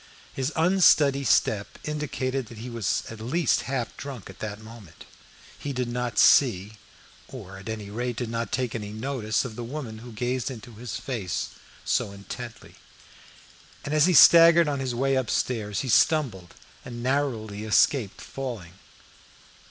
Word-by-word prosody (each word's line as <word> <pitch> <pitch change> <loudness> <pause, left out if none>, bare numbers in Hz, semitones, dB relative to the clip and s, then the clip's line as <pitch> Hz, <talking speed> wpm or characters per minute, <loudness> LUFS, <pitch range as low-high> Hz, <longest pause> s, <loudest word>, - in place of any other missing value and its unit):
His 135 +2 -2
unsteady 160 -5 +4
step 110 -3 +1
indicated 135 -4 -3
that 115 - -12
he 120 +3 -7
was 115 -5 -1
at 115 - -9
least 145 +6 +1
half 130 -3 -3
drunk 130 -9 -8
at 95 - -18
that 105 -1 -5
moment. 110 -6 -13 0.5
He 145 - -4
did 125 -1 -2
not 120 0 -3
see; 110 -5 +4 0.5
or 95 -7 -10
at 100 - -9
any 105 -2 -6
rate 120 +2 -3
did 115 -1 -4
not 115 -2 -3
take 125 -2 -1
any 105 -2 -5
notice 110 0 -2
of 115 -4 -7
the 120 - -5
woman 120 -3 -6
who 120 +2 -10
gazed 125 +3 -2
into 120 -2 -9
his 110 -2 -7
face 105 -9 -3 0.4
so 100 - 0
intently. 115 +4 -9 1.1
As 150 +2 +3
he 180 - +3
staggered 170 +2 +8
on 145 -2 -1
his 130 -2 -2
way 135 +2 +1
upstairs 115 -4 -1
he 135 - -5
stumbled 115 - +2 0.3
and 120 -1 -7
narrowly 120 -6 -1
escaped 110 0 +2
falling. 115 -10 -6
120 Hz, 150 wpm, -26 LUFS, 110-135 Hz, 1.1 s, staggered